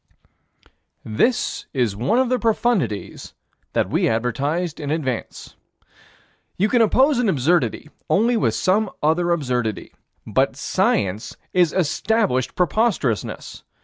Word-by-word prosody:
This 220 - 0
is 120 -6 +1
one 125 - 0
of 260 -1 +2
the 255 0 +1
profundities 215 - -1 0.4
that - - 0
we - - +2
advertised 140 +9 -1
in 145 -2 -4
advance. 140 -6 -4 1.0
You 205 +4 +2
can 245 +1 +3
oppose 260 +5 +3
an 240 -4 +2
absurdity 155 0 0 0.2
only 235 +4 +3
with 220 - +1
some 205 +3 +1
other 165 +3 +2
absurdity. 125 - -2 0.3
But - - +1
Science 100 +3 -1 0.2
is 175 -3 +3
established 185 - 0
preposterousness. 180 - -1
170 Hz, 115 wpm, -21 LUFS, -, 1.0 s, can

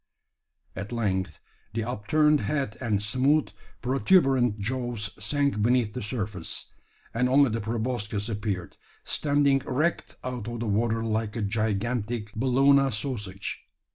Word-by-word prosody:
At 100 +3 -5
length 95 -8 -1 0.4
the 115 - 0
upturned 145 +7 +2
head 140 -8 -1
and 105 -5 0
smooth 135 +8 +2 0.3
protuberant 135 - +3
jaws 115 -2 -2
sank 140 -1 +1
beneath 120 -1 +2
the - - -4
surface; 105 -5 -4 0.4
and 125 +2 +2
only 135 -1 +5
the 115 +1 -1
proboscis 110 -2 -2
appeared, 105 -5 -3 0.3
standing 140 -2 +2
erect 155 +7 0
out 125 -4 -4
of 120 0 -4
the 120 - -2
water 115 +2 +1
like 110 -1 -1
a 115 - -1
gigantic 110 +1 -1
Bologna 135 +4 +4
sausage. 105 -5 -4
115 Hz, 125 wpm, -27 LUFS, 105-130 Hz, 0.4 s, only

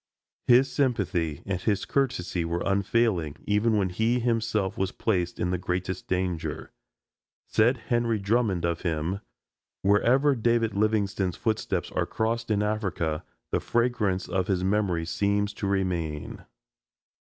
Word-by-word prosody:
His 130 +2 +5
sympathy 95 - 0
and 95 -2 -2
his 100 -2 0
courtesy 105 -11 0
were 85 +1 -2
unfailing, 100 -5 +1
even 105 +2 +2
when 95 -2 +1
he 110 +7 +1
himself 115 -4 0
was 95 0 -1
placed 90 -5 -1
in 90 - 0
the 90 - -1
greatest 90 0 -3
danger. 90 -3 -2 0.7
Said 120 +4 +3
Henry 115 0 0
Drummond 100 -3 +1
of 85 -1 -1
him: 85 +2 -1 0.6
"Wherever 120 +9 +4
David 115 -2 +1
Livingstone's 100 -3 0
footsteps 110 -2 -1
are - - -1
crossed 115 +1 -1
in 105 -1 +2
Africa 95 -7 -1 0.3
the - - +2
fragrance 115 -6 0
of 95 -1 -1
his 90 -2 0
memory 95 -4 +1
seems 100 +3 0
to 100 - -3
remain." 90 -6 -2
100 Hz, 130 wpm, -27 LUFS, 90-115 Hz, 0.7 s, His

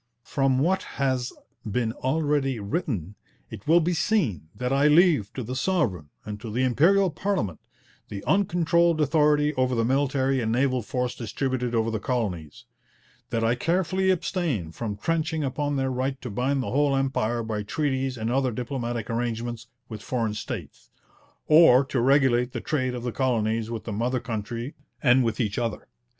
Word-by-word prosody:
'From 135 -1 +1
what 175 +8 +2 0.2
has 130 -3 0 0.3
been 110 +1 -1
already 135 -2 0
written, 105 - -3 0.4
it 100 - -9
will 165 +2 +6
be 175 +2 0
seen 160 - 0
that 125 +1 -2
I 140 +2 +4
leave 150 - +4
to 130 - -4
the 125 +4 -5
Sovereign 110 - 0 0.2
and 105 -1 -6
to 115 - -6
the 125 +4 0
Imperial 175 +9 +3
Parliament 160 - -2 0.5
the 100 -1 -6
uncontrolled 170 -3 +2
authority 150 0 +3
over 130 -2 +1
the 115 -1 +1
military 135 0 +1
and 110 -1 -1
naval 130 +1 +1
force 125 +1 -2
distributed 125 +1 -2
over 115 0 +1
the 110 - -2
colonies; 95 - -3 0.6
that 115 - -1
I 115 +1 +3
carefully 185 +7 0
abstain 165 - -1
from 105 +2 -5
trenching 160 +4 -1
upon 145 +2 -1
their 135 -1 0
right 130 +1 -2
to 125 - -5
bind 130 +5 0
the - - -4
whole 140 +1 +2
empire 120 -4 0
by 110 -2 -3
treaties 135 +2 -1
and 110 +1 -2
other 130 0 +1
diplomatic 120 -2 -3
arrangements 120 0 -3 0.2
with 110 -3 -8
foreign 115 0 -1
states; 105 - -7 0.6
or 150 -4 +7
to 130 -2 -1
regulate 130 -2 +3
the - - -3
trade 130 -5 -1
of 120 - -6
the 125 - -2
colonies 115 -3 0
with 115 -2 -5
the 110 - -5
mother 125 +4 0
country 115 +2 -5 0.3
and 130 -1 +5
with 115 -2 -1
each 105 -3 -1
other. 115 -2 -3
130 Hz, 165 wpm, -25 LUFS, 115-145 Hz, 0.6 s, or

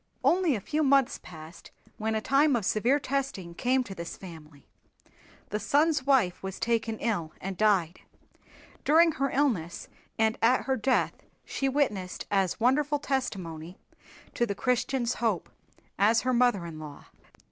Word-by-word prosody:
Only 350 -6 +3
a - - -2
few 305 +9 -1
months 275 -3 +3
passed 160 0 -12 0.3
when 220 0 -1
a 220 - 0
time 275 +3 +3
of 220 -5 -1
severe 240 +9 +2
testing 265 -11 -3
came 255 +7 +1
to 200 - -8
this 170 -2 -7
family. 160 -6 -12 0.8
The 210 - -2
son's 295 +1 +1
wife 240 -11 +3
was 190 0 -6
taken 225 -1 0
ill 200 -10 -2
and 195 0 -5
died. 190 -5 +2 0.8
During 330 +2 +5
her 275 -2 -1
illness 220 - -1 0.3
and 220 0 +1
at 245 +3 +3
her 265 - 0
death 260 +2 +1 0.3
she 270 - -1
witnessed 210 -10 -1
as 195 -3 +1
wonderful 285 +5 +2
testimony 185 - -4 0.6
to 240 - 0
the 200 - -3
Christian's 250 +1 0
hope 220 -7 -1 0.5
as 220 +3 +4
her 255 0 0
mother 240 -7 +2
in 160 -2 -8
law. 150 -2 -10
230 Hz, 150 wpm, -28 LUFS, 185-270 Hz, 0.8 s, During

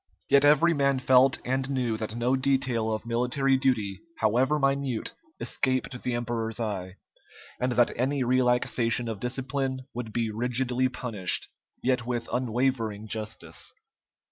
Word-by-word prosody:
Yet 140 0 +6
every 150 +4 +5
man 140 -2 +2
felt 130 0 +5
and 130 +1 -1
knew 125 -5 0
that 110 0 -5
no 120 +2 +1
detail 130 -4 +1
of 110 +1 -3
military 125 +3 +1
duty, 115 -8 0 0.2
however 125 +7 +2
minute, 135 -4 0 0.3
escaped 130 -1 -1
the 125 - -1
emperor's 115 -2 -2
eye, 95 -5 -3 0.6
and 125 0 0
that 120 -1 +4
any 135 +2 0
relaxation 125 -1 +1
of 110 -3 -4
discipline 130 +2 -2
would 120 -2 -5
be 115 -1 -1
rigidly 125 +3 0
punished, 115 -8 -1 0.3
yet 125 -1 +1
with 120 -1 -3
unwavering 120 -3 0
justice. 110 0 -4
125 Hz, 135 wpm, -27 LUFS, 115-130 Hz, 0.6 s, Yet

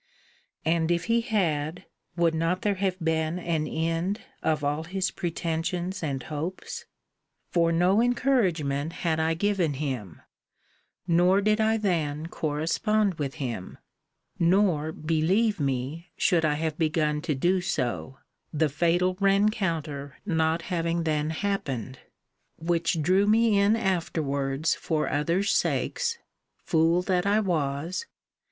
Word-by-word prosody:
And 165 0 +2
if 170 0 +1
he 230 +3 +2
had, 170 - -1 0.3
would 170 -2 +2
not 165 +3 0
there 205 - +2
have 190 -1 -1
been 160 0 0
an 165 -3 -1
end 165 +7 -1 0.2
of 155 -2 0
all 145 +3 -1
his 190 +2 -1
pretensions 175 +2 -3
and 135 -5 -2
hopes? 160 +5 -5 0.7
For 170 -1 +3
no 180 +6 +3
encouragement 180 - +1
had 160 -1 +2
I 160 +1 +1
given 180 -5 +1
him; 130 - -4 0.8
nor 180 +3 +4
did 215 +2 +2
I 220 +1 +3
then 160 -7 -1
correspond 170 +6 0
with 140 -2 -3
him. 120 -9 -5 0.6
Nor, 170 -3 +3
believe 165 +8 +1
me, 140 +5 -2
should 170 -4 +3
I 150 -1 +2
have 155 +1 -3
begun 155 -2 +1
to 160 -2 -1
do 180 +7 +2
so 135 -6 -2 0.3
the 155 0 +1
fatal 175 +5 +2
rencounter 190 - 0
not 160 -2 +1
having 170 -2 -1
then 155 -1 0
happened; 145 - -3 0.6
which 165 -1 0
drew 190 +5 +3
me 220 -1 +4
in 200 +2 +4
afterwards 160 -8 0
for 155 -2 -1
others' 170 +7 +1
sakes 470 -1 0 0.5
(fool 165 +1 +2
that 180 0 +1
I 205 +2 +4
was!) 165 - -1
165 Hz, 125 wpm, -27 LUFS, 155-190 Hz, 0.8 s, nor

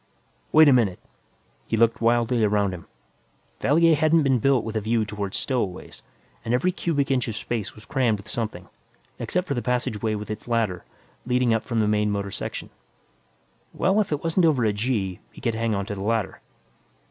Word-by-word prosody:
"Wait 155 0 +7
a 140 - +7
minute." 110 -8 +2 0.7
He 115 - 0
looked 115 +1 +3
wildly 120 0 +2
about 100 -2 +2
him. 85 -2 -9 0.7
Valier 165 +3 +4
hadn't 155 +1 +3
been 135 -3 +2
built 135 0 +2
with 110 0 -5
a 110 - 0
view 110 +1 +1
toward 100 -2 -4
stowaways; 110 -9 -3 0.4
and 120 - +1
every 180 +9 +1
cubic 145 -6 -1
inch 130 -2 +1
of 115 - -4
space 105 -1 -4
was 110 - -14
crammed 125 -6 +1
with 100 - -13
something, 105 -6 -4 0.5
except 180 +1 -1
for 140 - -1
the 120 - -2
passageway 110 -3 -1
with 105 0 -5
its 110 +2 -7
ladder, 110 -7 0 0.4
leading 125 -1 +2
up 115 - +1
from 115 -1 -1
the 105 - +1
main 105 0 +2
motor 100 -1 -2
section. - - -6 1.0
Well, 190 +4 +2
if 200 - -4
it 150 0 -2
wasn't 165 +1 +3
over 135 -7 +2
a 105 - +2
"g," 105 -4 -1
he - - -14
could 115 - -1
hang 115 -1 -1
on 100 0 -2
to 105 - -5
the 95 - -6
ladder. 110 0 -1
115 Hz, 195 wpm, -24 LUFS, 105-135 Hz, 1.0 s, Wait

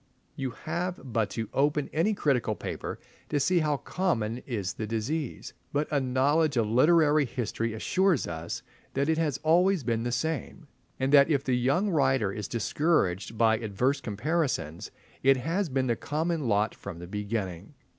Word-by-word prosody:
You 135 -1 -2 0.2
have 175 +3 -2
but 110 -2 +1
to 110 +1 -4
open 145 +1 +1
any 185 +7 +2
critical 125 - +1
paper - - -5 0.3
to 145 - +1
see 180 +5 +3
how 150 -2 +1
common 125 - -1
is 100 -8 -2
the 110 - -5
disease, 120 +6 -3 0.2
but 145 +1 0
a 145 - +3
knowledge 135 +3 +2
of 115 - +3
literary 150 +5 +4
history 115 -2 -3
assures 185 - +2
us 80 0 -5 0.3
that 140 +3 +1
it 160 0 +2
has 150 -5 0
always 175 +1 +3
been 115 -1 0
the 120 +1 -2
same, 160 +5 -3 0.3
and 135 +2 0
that 140 +1 +7
if 140 -3 +2
the 130 - 0
young 140 +12 +1
writer 135 - +2
is 105 -1 -5
discouraged 115 - 0
by 110 -1 +4
adverse 125 +6 0
comparisons 120 - -2 0.3
it 135 0 +5
has 165 +7 -1
been 130 -1 0
the 120 -2 +1
common 155 +2 -2
lot 105 0 +2
from 100 -4 -8
the 85 - -8
beginning. 100 - -4
135 Hz, 165 wpm, -28 LUFS, 110-155 Hz, 0.3 s, that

